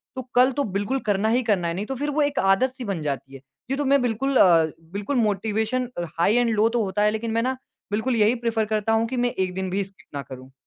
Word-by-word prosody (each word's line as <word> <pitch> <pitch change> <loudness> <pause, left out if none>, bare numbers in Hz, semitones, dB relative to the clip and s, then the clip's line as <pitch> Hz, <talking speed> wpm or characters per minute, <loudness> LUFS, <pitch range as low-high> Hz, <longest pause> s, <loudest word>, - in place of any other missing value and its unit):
तो 260 - -3
कल 255 +2 +5
तो 285 +2 -1
बिल्कुल 220 +7 0
करना 205 +2 +2
ही 240 +3 +2
करना 195 -6 +1
है 170 - -1
नहीं 200 +4 -3
तो 270 - -4
फ़िर 290 +3 -2
वो 295 +1 0
एक 290 -1 +1
आदत 195 +7 +3
सी 255 - -6
बन 195 -5 -3
जाती 135 -2 -4
है। - - -9 0.3
जी 270 - 0
तो 290 0 -2
मैं 280 0 +4
बिल्कुल 250 +3 -1
अ, 170 -6 +6 0.3
बिल्कुल 205 +8 -3
motivation 220 +2 0
a, 175 - -1 0.2
high 200 +7 +3
and 245 -1 +3
low 215 +2 +3
तो 235 -1 0
होता 200 +1 -1
है 210 - +4
लेकिन 225 +1 -3
मैं 230 +1 +1
ना 260 +1 -1 0.3
बिल्कुल 220 +5 0
यही 220 +2 +3
प्रेफ़र 225 -1 +1
करता 215 +1 0
हूँ 225 +1 +2
कि 255 - -4
मैं 245 0 +1
एक 185 -3 -2
दिन 190 0 -2
भी 195 +2 -1
स्किप 195 0 -16
ना 140 - -2
करूँ। 130 -1 -11
220 Hz, 270 wpm, -24 LUFS, 195-250 Hz, 0.3 s, अ